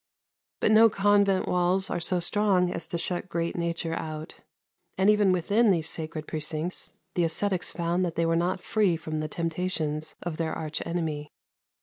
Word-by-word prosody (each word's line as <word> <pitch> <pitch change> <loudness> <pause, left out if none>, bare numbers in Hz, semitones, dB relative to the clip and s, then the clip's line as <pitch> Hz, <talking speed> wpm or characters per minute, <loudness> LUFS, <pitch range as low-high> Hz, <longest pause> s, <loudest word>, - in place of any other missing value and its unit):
But - - +3
no 225 +1 +7
convent 200 -1 +3
walls 180 +2 +1
are - - -1
so 180 +1 +2
strong 185 -1 +2
as - - -4
to 170 - -3
shut 180 +2 -3
great 170 -1 -2
nature 170 -1 -2
out; 155 0 -5 0.6
and 190 +2 +5
even 210 -2 +4
within 205 +6 +3
these 165 -5 +2
sacred 155 -1 -5
precincts 155 +3 -4 0.2
the 175 - +1
ascetics 180 +3 0
found 175 +1 -1
that 170 -2 -2
they 165 - +1
were 165 0 +2
not 175 +2 0
free 200 -6 +2
from 155 -1 -4
the 155 - -2
temptations 160 -2 -2
of 175 -3 -4
their 160 -1 -1
arch 155 -1 -3
enemy. 155 -3 -3
170 Hz, 175 wpm, -27 LUFS, 160-185 Hz, 0.6 s, no